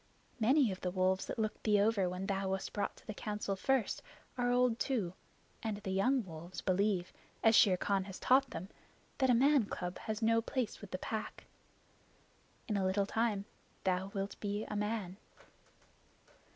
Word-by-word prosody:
Many 255 Hz, +1 st, +4 dB
of 185 Hz, -, -6 dB
the 180 Hz, -, -1 dB
wolves 185 Hz, +1 st, +1 dB
that -, -, -4 dB
looked 215 Hz, -1 st, -2 dB
thee 210 Hz, -2 st, +4 dB
over 200 Hz, -3 st, +3 dB
when 180 Hz, +2 st, -4 dB
thou 195 Hz, -1 st, -1 dB
wast 190 Hz, 0 st, -3 dB
brought 205 Hz, -, -2 dB
to -, -, -19 dB
the 215 Hz, -, -5 dB
Council 210 Hz, -1 st, -3 dB
first 255 Hz, +5 st, +1 dB, 0.3 s
are 245 Hz, -1 st, +1 dB
old 245 Hz, -1 st, +3 dB
too, 215 Hz, -11 st, 0 dB, 0.5 s
and 220 Hz, -2 st, -2 dB
the 200 Hz, -2 st, -5 dB
young 240 Hz, +5 st, +2 dB
wolves 170 Hz, +1 st, -8 dB
believe, 190 Hz, -1 st, +1 dB, 0.3 s
as 225 Hz, -, +6 dB
Shere 190 Hz, -5 st, +6 dB
Khan 195 Hz, 0 st, 0 dB
has 190 Hz, -2 st, -7 dB
taught 265 Hz, +2 st, +4 dB
them, 185 Hz, +4 st, -6 dB, 0.5 s
that 265 Hz, -1 st, +3 dB
a 245 Hz, -, +6 dB
man 275 Hz, 0 st, +5 dB
cub 180 Hz, -2 st, -4 dB
has 220 Hz, +1 st, -3 dB
no 230 Hz, +1 st, +4 dB
place 250 Hz, 0 st, -3 dB
with 205 Hz, -, -9 dB
the 185 Hz, -, -3 dB
Pack. 220 Hz, +3 st, -5 dB, 1.2 s
In 210 Hz, -3 st, 0 dB
a 195 Hz, -, +1 dB
little 195 Hz, +1 st, +2 dB
time 215 Hz, -2 st, 0 dB, 0.4 s
thou 185 Hz, 0 st, +1 dB
wilt 195 Hz, 0 st, -4 dB
be 205 Hz, +1 st, -2 dB
a 210 Hz, -, -5 dB
man." 210 Hz, -3 st, -2 dB
205 Hz, 180 wpm, -34 LUFS, 190-230 Hz, 1.2 s, as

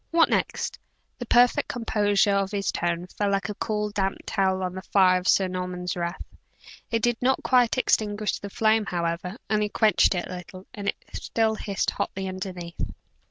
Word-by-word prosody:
What 330 Hz, 0 st, +4 dB
next?" -, -, -1 dB, 0.4 s
The 245 Hz, -, -5 dB
perfect 245 Hz, +1 st, +4 dB
composure 205 Hz, -4 st, +1 dB
of 195 Hz, -1 st, +1 dB
his 200 Hz, -1 st, -1 dB
tone 170 Hz, 0 st, -1 dB
fell 200 Hz, +2 st, -2 dB
like 195 Hz, +1 st, 0 dB
a -, -, -2 dB
cool, 210 Hz, 0 st, -2 dB
damp 195 Hz, -2 st, -1 dB
towel 190 Hz, -2 st, 0 dB
on 180 Hz, -1 st, -2 dB
the 185 Hz, -, -6 dB
fire 185 Hz, -2 st, +4 dB
of 180 Hz, -, -6 dB
Sir 190 Hz, -, +4 dB
Norman's 180 Hz, -1 st, -4 dB
wrath. 170 Hz, 0 st, -4 dB, 0.6 s
It 230 Hz, -1 st, -1 dB
did 240 Hz, -1 st, +1 dB
not 260 Hz, +2 st, +2 dB
quite 250 Hz, -1 st, +3 dB
extinguish 210 Hz, -4 st, +1 dB
the 200 Hz, -, -7 dB
flame, 220 Hz, 0 st, +2 dB
however 175 Hz, +3 st, -2 dB
only 210 Hz, -1 st, +1 dB
quenched 215 Hz, -2 st, +3 dB
it 175 Hz, -, -2 dB
a -, -, -9 dB
little 185 Hz, +1 st, -11 dB
and 200 Hz, -1 st, -6 dB
it -, -, +1 dB, 0.2 s
still 225 Hz, -1 st, 0 dB
hissed 200 Hz, -2 st, -2 dB
hotly 190 Hz, 0 st, -3 dB
underneath. 185 Hz, -2 st, -6 dB
200 Hz, 180 wpm, -25 LUFS, 185-215 Hz, 0.6 s, What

